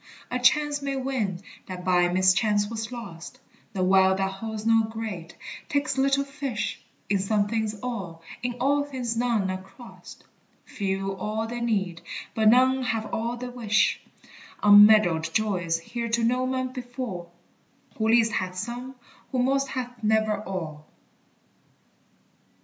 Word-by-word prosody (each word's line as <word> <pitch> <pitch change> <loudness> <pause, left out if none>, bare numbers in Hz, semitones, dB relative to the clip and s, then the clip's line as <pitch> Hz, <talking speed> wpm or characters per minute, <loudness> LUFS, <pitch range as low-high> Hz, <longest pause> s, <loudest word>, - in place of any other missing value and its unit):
A 250 - 0
chance 290 +3 +3
may 275 -1 -2
win 240 -9 -2 0.2
that 180 -1 -7
by 180 -1 +4
mischance 190 +3 +3
was 220 +1 -5
lost; 230 -1 -8 0.3
The 190 -2 -1
well 190 0 +5
that 195 0 -1
holds 215 +2 -6
no 225 0 +5
great, 215 -7 -6 0.3
takes 285 -1 0
little 275 +1 +2
fish; 275 -7 -4 0.3
In 200 -1 +1
some 205 +1 +1
things 220 -1 -2
all, 190 -10 -5 0.2
in 245 0 -2
all 285 +3 +2
things 255 -5 -3
none 230 -5 +1
are 185 0 -4
crossed, 195 +5 -14 0.4
Few 195 0 -2
all 215 +2 -2
they 240 +2 -5
need, 195 -7 -1 0.3
but 220 -1 +4
none 260 +3 +4
have 225 -3 -2
all 235 +2 -2
they 250 +1 -6
wish; 225 -3 +1 0.6
Unmeddled 205 -5 +7
joys 180 -6 +1
here 235 +8 -5
to 230 +1 +1
no 250 +2 +1
man 255 0 -1
befall, 245 -9 -6 0.7
Who 220 - 0
least 230 0 +4
hath 185 -3 -2
some, 245 +6 -5 0.4
who 260 - -2
most 275 +2 +2
hath 245 -3 -6
never 215 -1 +2
all. 160 -6 -6
220 Hz, 145 wpm, -26 LUFS, 195-245 Hz, 0.7 s, Unmeddled